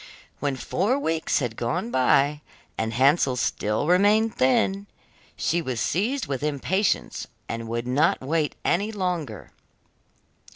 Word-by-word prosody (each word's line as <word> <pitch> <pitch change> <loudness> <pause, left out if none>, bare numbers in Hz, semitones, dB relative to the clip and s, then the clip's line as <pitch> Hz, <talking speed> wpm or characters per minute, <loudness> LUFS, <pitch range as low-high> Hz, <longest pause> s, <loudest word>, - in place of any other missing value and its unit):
When 140 -1 -1
four 200 - 0
weeks 165 - 0
had 120 -5 -2
gone 120 0 -2
by, 135 +3 +3 0.3
and 110 0 -2
Hansel 135 +2 +3
still 105 0 -1
remained 205 +6 +4
thin, 195 +10 +1 0.5
she 175 - 0
was 130 -6 -3
seized 215 - 0
with 135 -1 -3
impatience 150 +7 -1 0.2
and 115 0 -5
would 115 +1 -3
not 140 +6 +2
wait 150 +2 -1
any 205 +5 +1
longer. 175 - -3
145 Hz, 125 wpm, -25 LUFS, 125-185 Hz, 0.5 s, remained